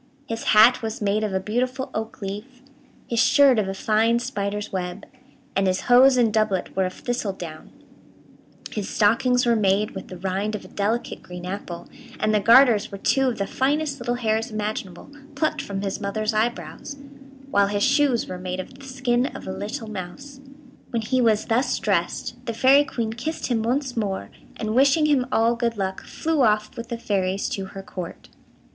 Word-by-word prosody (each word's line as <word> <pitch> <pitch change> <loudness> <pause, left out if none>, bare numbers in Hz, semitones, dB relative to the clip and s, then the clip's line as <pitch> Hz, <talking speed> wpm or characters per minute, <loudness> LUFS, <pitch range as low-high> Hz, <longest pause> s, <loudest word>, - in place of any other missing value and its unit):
His 225 0 -4
hat 225 +4 +6
was 225 0 -4
made 210 +1 0
of 210 - -1
a 190 - 0
beautiful 255 +6 -2
oak 220 -1 -5
leaf, 225 +7 -7 0.4
his 235 - -1
shirt 270 -1 +5
of 205 - 0
a 195 - -3
fine 220 +3 +2
spider's 210 -5 -3
web, 180 +1 -4 0.5
and 195 0 +2
his 185 0 +1
hose 255 +2 +6
and 230 -3 +3
doublet 215 -4 0
were 190 0 +2
of 185 - -7
thistledown, 190 -10 -5 1.0
his 210 -3 -4
stockings 245 +4 +3
were 235 -1 +4
made 205 0 +2
with 190 - -8
the 185 - -9
rind 195 +4 -2
of 210 - -7
a - - -12
delicate 215 +4 -2
green 180 0 -9
apple, 180 -2 -6 0.3
and 215 - +1
the 210 - +4
garters 230 -1 +5
were 200 - -6
two 270 +6 +2
of 245 - -1
the 200 - -1
finest 280 +4 0
little 240 0 -1
hairs 225 -1 0
imaginable, 215 0 -5 0.2
plucked 310 - 0
from 200 0 -5
his 195 +1 -3
mother's 215 +2 -1
eyebrows, 215 - -2 0.5
while 200 0 +4
his 205 0 0
shoes 275 -3 +3
were 180 -1 -6
made 185 0 -4
of 185 - -7
the 275 - -12
skin 250 -1 0
of - - -9
a - - -4
little 210 +3 -5
mouse. 215 +8 -8 0.5
When 230 -2 -2
he 255 +3 +1
was 220 -3 +3
thus 245 +3 +1
dressed, 205 +5 -1
the 230 - -2
Fairy 275 +4 +5
Queen 225 -5 -3
kissed 310 +8 -4
him 225 -2 +2
once 250 +3 -1
more, 200 -4 -3 0.3
and, 215 -1 -2
wishing 275 +5 +4
him 275 -5 +2
all 230 +1 +3
good 235 -1 -1
luck, 190 -1 -2
flew 320 -2 -1
off 215 -3 +2
with 230 0 -7
the 235 - -3
fairies 195 -3 -1
to 195 - -3
her 195 0 -9
Court. 180 -3 -8
220 Hz, 190 wpm, -24 LUFS, 200-250 Hz, 1.0 s, hat